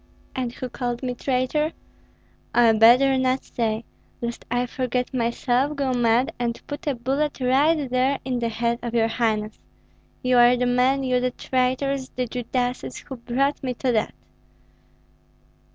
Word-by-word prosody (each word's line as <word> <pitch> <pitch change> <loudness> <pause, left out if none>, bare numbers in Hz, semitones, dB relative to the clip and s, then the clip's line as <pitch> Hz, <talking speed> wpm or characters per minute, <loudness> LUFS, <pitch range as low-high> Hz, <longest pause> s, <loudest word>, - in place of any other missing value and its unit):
And 250 -2 -2
who 255 - -5
called 245 0 -4
me 250 -1 -1
traitor? 265 +5 0 0.8
Oi, 235 -2 +6
better 250 +5 +6
not 260 0 +1
say, 225 -1 -2 0.4
lest 235 0 -5
I 245 +1 +1
forget 250 0 -2
myself, 250 +3 0
go 275 -2 0
mad, 240 +1 +2
and 235 -1 -2
put 290 +3 -7
a 285 - +1
bullet 275 +5 -1
right 270 +6 +3
here 265 -1 +1
in 255 -2 -1
the 235 -1 -1
head 235 +1 -1
of 235 -1 -4
your 225 -1 +3
highness. 220 -2 -1 0.6
You 250 -1 +4
are 240 +1 +6
the 250 - +1
men, 250 +2 +2
you 255 -1 +1
the 250 0 0
traitors, 260 +2 -1
the 255 - -1
Judases, 245 - -3
who 265 - -8
brought 260 +4 -1
me 255 -3 -3
to 255 +1 0
that." 220 -2 0
250 Hz, 155 wpm, -24 LUFS, 235-265 Hz, 0.8 s, Oi